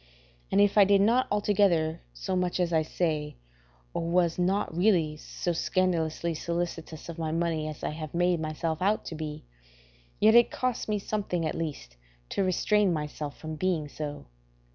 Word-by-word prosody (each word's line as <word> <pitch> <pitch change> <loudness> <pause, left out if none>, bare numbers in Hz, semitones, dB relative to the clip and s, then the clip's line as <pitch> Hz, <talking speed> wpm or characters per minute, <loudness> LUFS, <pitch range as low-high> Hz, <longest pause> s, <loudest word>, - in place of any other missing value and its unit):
And - - +3
if 205 +1 +5
I - - +10
did 200 0 +4
not 235 +5 +3
altogether 195 -6 +2
so - - -3
much 180 0 0
as 175 -1 +1
I 160 - +4
say, 155 -2 -2 0.6
or - - -1
was 175 -1 +2
not 185 -1 0
really 175 -5 +3
so 175 +3 -3
scandalously 170 -2 0
solicitous 165 -1 -4
of 170 -1 -7
my 160 -1 -1
money 165 -2 0
as 155 -1 -7
I - - -1
have 155 +1 -7
made 175 0 +2
myself 160 +1 -3
out 205 +3 +1
to - - -5
be, 155 -1 -6 0.7
yet 220 +1 +6
it 240 0 +7
cost 255 -3 -2
me 210 - +1
something 195 -4 -2
at - - -1
least 145 - -5 0.3
to - - 0
restrain 195 +2 +2
myself 150 -2 -4
from 155 0 -6
being 170 -4 0
so. 145 0 -6
170 Hz, 170 wpm, -28 LUFS, 155-190 Hz, 0.7 s, I